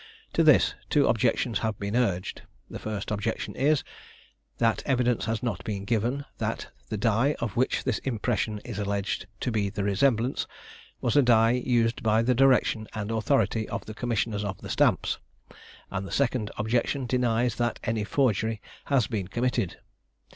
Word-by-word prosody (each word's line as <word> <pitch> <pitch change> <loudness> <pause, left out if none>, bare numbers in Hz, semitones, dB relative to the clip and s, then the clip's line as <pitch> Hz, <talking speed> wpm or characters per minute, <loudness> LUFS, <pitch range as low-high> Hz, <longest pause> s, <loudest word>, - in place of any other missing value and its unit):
To - - +3
this, - - +5 0.2
two - - +4
objections 115 -4 +1
have 110 -2 -2
been 100 +2 -3
urged; 95 -7 0 0.3
the - - -7
first 105 -2 -4
objection 105 +2 -2
is, 145 +2 +2 0.7
that 115 -2 +2
evidence 125 -4 +2
has 115 +2 -2
not 115 -7 -2
been 100 -2 -4
given, 120 +6 0
that - - -3 0.2
the 110 - -2
die 115 +7 +2
of 115 -3 -3
which 130 +2 +1
this 130 -5 0
impression 110 -3 -1
is 115 -4 -5
alleged 100 -1 -2
to 125 - -1
be 105 -3 0
the 100 0 -3
resemblance, 115 +5 +1 0.5
was 120 - 0
a 145 - +7
die 115 -3 +5
used 120 -2 +1
by 110 +1 +3
the 125 +2 +3
direction 125 -4 +3
and 105 0 -3
authority 110 -1 +1
of - - -4
the 110 - -7
commissioners 110 -2 -1
of 100 -2 -4
the - - -8
stamps; - - +2 0.7
and 100 0 -3
the - - -10
second 125 -5 0
objection 120 +5 0
denies 120 -1 +1
that 120 -1 0
any 110 -1 -1
forgery 110 -2 +1 0.3
has 135 -5 +2
been 105 -6 -3
committed. 120 -2 -1
115 Hz, 165 wpm, -27 LUFS, 105-125 Hz, 0.7 s, a